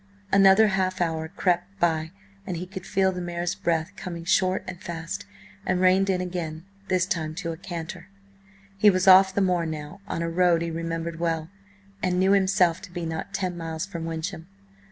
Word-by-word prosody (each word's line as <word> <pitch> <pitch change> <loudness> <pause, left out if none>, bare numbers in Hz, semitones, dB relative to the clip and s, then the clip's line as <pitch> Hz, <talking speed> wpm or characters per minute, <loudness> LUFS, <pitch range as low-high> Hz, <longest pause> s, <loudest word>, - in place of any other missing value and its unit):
Another 195 +2 +6
half 185 -1 0
hour 160 -2 -1
crept 185 +2 -1
by, 160 -2 +1 0.4
and 175 - -3
he 180 - -4
could 190 0 -8
feel 195 -1 +2
the 180 -1 -5
mare's 175 +1 -2
breath 165 +1 -1
coming 170 -4 -6
short 185 0 +2
and 185 -1 -7
fast, 160 - -5 0.4
and 185 -1 0
reined 185 +1 +4
in 185 -1 +1
again, 170 -2 -4 0.2
this 185 -2 +2
time 160 -4 -2
to 170 -2 -3
a - - -5
canter. 175 0 -7 0.7
He 210 - +7
was 185 -1 +1
off 190 0 +8
the 200 - +2
moor 180 -3 +2
now, 155 +3 -6
on 170 - -2
a - - -1
road 175 -1 +3
he 170 - -3
remembered 165 0 -4
well, 165 -1 -1 0.5
and 180 -1 +1
knew 190 +1 +4
himself 190 -3 +3
to - - -11
be 175 -1 -4
not 160 +3 -4
ten 185 -2 -2
miles 165 +1 -4
from 170 -5 -6
Wyncham. 165 +1 -5
175 Hz, 190 wpm, -25 LUFS, 165-190 Hz, 0.7 s, off